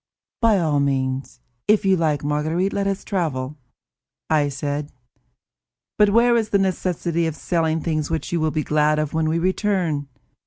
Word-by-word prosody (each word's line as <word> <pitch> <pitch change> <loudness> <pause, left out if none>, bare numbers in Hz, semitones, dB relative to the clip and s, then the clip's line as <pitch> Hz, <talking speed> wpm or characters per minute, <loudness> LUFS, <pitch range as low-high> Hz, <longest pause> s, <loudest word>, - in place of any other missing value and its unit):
"By 225 -3 +4
all 155 -5 +1
means, 135 -1 -1 0.3
if 210 -1 +3
you 190 -1 +4
like, 155 -5 0
Marguerite, 155 +6 0
let 200 0 0
us 195 -1 -2
travel," 150 -7 -2 0.7
I 150 -2 +3
said. 145 +2 -4 1.1
"But 210 -1 +6
where 235 +3 +4
is 225 -2 +1
the 200 - +3
necessity 175 -3 0
of 160 - -3
selling 160 -1 0
things 155 -2 -1
which 160 -1 -3
you 170 - 0
will 155 0 +1
be 155 0 -1
glad 150 +1 +2
of 155 -1 -2
when 160 -1 +1
we 160 - +1
return? 180 -5 0
160 Hz, 165 wpm, -22 LUFS, 150-190 Hz, 1.1 s, But